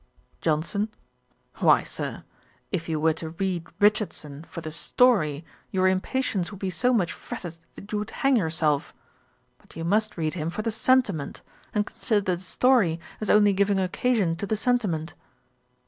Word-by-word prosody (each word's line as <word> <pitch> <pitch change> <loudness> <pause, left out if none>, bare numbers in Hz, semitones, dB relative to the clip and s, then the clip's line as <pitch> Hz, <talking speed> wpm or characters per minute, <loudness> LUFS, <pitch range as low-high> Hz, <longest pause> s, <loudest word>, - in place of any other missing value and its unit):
JOHNSON. 170 +7 0 0.7
'Why, - - +5
Sir, - - -5 0.5
if 170 -3 -2
you 155 -1 0
were 160 +1 +3
to 160 0 -6
read 175 0 -2
Richardson 205 -8 +1
for 170 - -6
the 155 -1 -6
story, 165 - +2 0.2
your 185 0 +2
impatience 190 0 0
would 200 - -9
be 190 -2 -2
so 245 +7 +2
much 200 -8 +1
fretted 175 -3 -7 0.2
that 200 - -11
you 210 - 0
would 210 - -4
hang 275 -1 +2
yourself. 160 - +1 0.6
But - - -20
you 165 - -5
must 210 +5 +1
read 155 -2 -1
him 160 -2 -2
for 195 +5 -4
the 225 - 0
sentiment, 220 - +1 0.3
and 210 -1 +1
consider 205 -7 0
the - - -12
story 190 -5 +3 0.2
as 215 - -3
only 205 -1 +5
giving 200 0 +2
occasion 190 -1 +1
to 200 - -4
the 220 - +1
sentiment.' 205 -10 0
190 Hz, 160 wpm, -26 LUFS, 165-215 Hz, 0.7 s, Why